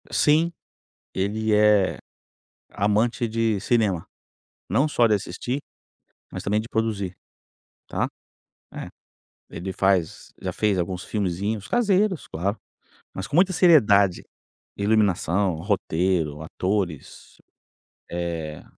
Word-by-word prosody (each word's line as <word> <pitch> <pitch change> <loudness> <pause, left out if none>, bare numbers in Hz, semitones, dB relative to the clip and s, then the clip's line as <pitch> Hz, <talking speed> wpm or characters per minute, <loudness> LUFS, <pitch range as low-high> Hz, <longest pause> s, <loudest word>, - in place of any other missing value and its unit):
Sim, 160 +3 +3 0.6
ele 105 +3 0
é 105 -2 +4 0.7
amante 110 +5 +1
de 115 -1 0
cinema, 105 -6 +1 0.6
não 130 - +3
só 120 -6 +3
de 110 - +3
assistir, 105 +7 -3 0.7
mas - - -6
também 105 +2 +1
de 110 - -8
produzir, 105 -5 -2 0.7
tá. - - -1 0.7
É, - - -6 0.6
ele 95 +3 -5
faz 95 -3 0
já - - -3
fez 105 -3 +1
alguns 90 +1 -2
filmezinhos, 100 +1 -2
caseiros, 205 - +1
claro. 95 +6 -2 0.6
Mas 95 - -5
com - - -4
muita 185 +3 +5
seriedade, 105 - +5 0.5
Iluminação, 100 -3 +2
roteiro, 85 -4 0
atores, 90 -2 -3 0.7
eh, 85 -3 -4
100 Hz, 100 wpm, -24 LUFS, 90-115 Hz, 0.7 s, muita